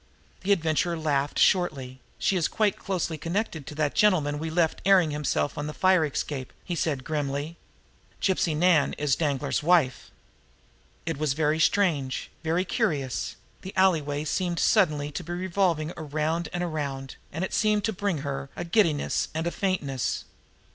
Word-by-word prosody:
The 195 Hz, -, -1 dB
Adventurer 170 Hz, -1 st, +1 dB
laughed 145 Hz, -2 st, 0 dB
shortly. 135 Hz, -8 st, +2 dB, 0.2 s
"She 195 Hz, -, +1 dB
is 170 Hz, -3 st, +2 dB
quite 215 Hz, -3 st, +1 dB
closely 170 Hz, -4 st, -3 dB
connected 165 Hz, -2 st, -3 dB
with 150 Hz, -, -9 dB
that 150 Hz, -2 st, +1 dB
gentleman 155 Hz, -8 st, +3 dB
we 160 Hz, +1 st, -3 dB
left 160 Hz, 0 st, +1 dB
airing 185 Hz, -5 st, +5 dB
himself 145 Hz, 0 st, -1 dB
on 150 Hz, -, -3 dB
the 150 Hz, -, -6 dB
fire 185 Hz, -3 st, +4 dB
escape," 140 Hz, -2 st, -3 dB
he 175 Hz, -, -4 dB
said 150 Hz, -6 st, -1 dB
grimly. 145 Hz, +1 st, -2 dB, 0.6 s
"Gypsy 175 Hz, -5 st, +1 dB
Nan 170 Hz, -3 st, +4 dB
is 145 Hz, -2 st, +1 dB
Danglar's 145 Hz, -3 st, -1 dB
wife." 155 Hz, -5 st, +2 dB, 1.0 s
It 165 Hz, -3 st, -2 dB
was 150 Hz, -3 st, +1 dB
very 155 Hz, +1 st, +1 dB
strange, 155 Hz, -7 st, +1 dB
very 165 Hz, +3 st, +1 dB
curious 140 Hz, -7 st, -1 dB, 0.3 s
the 190 Hz, -, -9 dB
alleyway 155 Hz, -6 st, +2 dB
seemed 175 Hz, +2 st, -1 dB
suddenly 150 Hz, -10 st, +2 dB
to -, -, -5 dB
be 175 Hz, -, -5 dB
revolving 175 Hz, -3 st, 0 dB
around 155 Hz, +3 st, -2 dB
and 175 Hz, 0 st, -2 dB
around, 140 Hz, -5 st, -4 dB
and 165 Hz, +5 st, -3 dB
it -, -, -3 dB
seemed 210 Hz, -1 st, +2 dB
to 220 Hz, -, 0 dB
bring 190 Hz, -6 st, -1 dB
her 135 Hz, -1 st, -4 dB
a -, -, -4 dB
giddiness 170 Hz, -4 st, +1 dB
and 160 Hz, +1 st, -1 dB
a 170 Hz, -, 0 dB
faintness. 150 Hz, -11 st, -1 dB
160 Hz, 160 wpm, -26 LUFS, 145-180 Hz, 1.0 s, airing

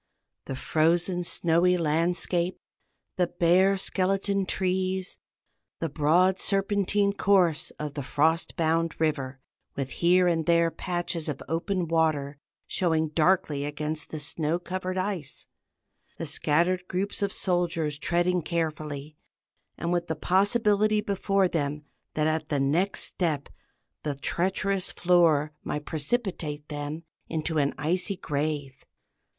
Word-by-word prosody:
the 135 Hz, -, -4 dB
frozen 170 Hz, +6 st, +1 dB
snowy 175 Hz, +1 st, +2 dB
landscape; 170 Hz, +2 st, 0 dB, 0.6 s
the 180 Hz, -1 st, +2 dB
bare 185 Hz, +4 st, +3 dB
skeleton 195 Hz, +1 st, 0 dB
trees; 185 Hz, 0 st, -1 dB, 0.6 s
the 165 Hz, -, -2 dB
broad 170 Hz, +6 st, +3 dB
serpentine 200 Hz, 0 st, +1 dB
course 185 Hz, -6 st, +2 dB
of 150 Hz, -2 st, -5 dB
the 145 Hz, -, -4 dB
frost 160 Hz, +5 st, +1 dB
bound 165 Hz, 0 st, 0 dB
river, 140 Hz, -4 st, -1 dB, 0.4 s
with 135 Hz, -1 st, -3 dB
here 180 Hz, +1 st, +3 dB
and 165 Hz, -2 st, 0 dB
there 170 Hz, -1 st, +4 dB
patches 175 Hz, -3 st, -3 dB
of 140 Hz, -, -4 dB
open 175 Hz, +2 st, -1 dB
water 155 Hz, -3 st, 0 dB, 0.3 s
showing 160 Hz, -3 st, +1 dB
darkly 155 Hz, -2 st, +2 dB
against 150 Hz, +1 st, -4 dB
the 155 Hz, -, -5 dB
snow 155 Hz, +2 st, -1 dB
covered 185 Hz, +1 st, -4 dB
ice; 185 Hz, -7 st, -3 dB, 0.7 s
the 165 Hz, -, -4 dB
scattered 170 Hz, +5 st, +1 dB
groups 195 Hz, +3 st, -1 dB
of 200 Hz, -1 st, 0 dB
soldiers 170 Hz, -6 st, 0 dB
treading 175 Hz, +2 st, +1 dB
carefully, 155 Hz, -3 st, -3 dB, 0.6 s
and 170 Hz, +1 st, -2 dB
with 175 Hz, -1 st, 0 dB
the 160 Hz, -, -2 dB
possibility 205 Hz, +4 st, +2 dB
before 195 Hz, -1 st, +1 dB
them 150 Hz, -3 st, -2 dB, 0.3 s
that 155 Hz, -, +1 dB
at 155 Hz, 0 st, -1 dB
the 145 Hz, -, 0 dB
next 160 Hz, +9 st, +1 dB
step 155 Hz, -6 st, -2 dB, 0.5 s
the 150 Hz, -2 st, -3 dB
treacherous 190 Hz, +5 st, 0 dB
floor 165 Hz, -4 st, +3 dB
might 150 Hz, 0 st, -4 dB
precipitate 155 Hz, -, -3 dB
them 150 Hz, +2 st, -5 dB, 0.3 s
into 160 Hz, 0 st, -1 dB
an 140 Hz, -1 st, +2 dB
icy 180 Hz, +7 st, -1 dB
grave. 145 Hz, -4 st, -3 dB
170 Hz, 125 wpm, -27 LUFS, 150-185 Hz, 0.7 s, there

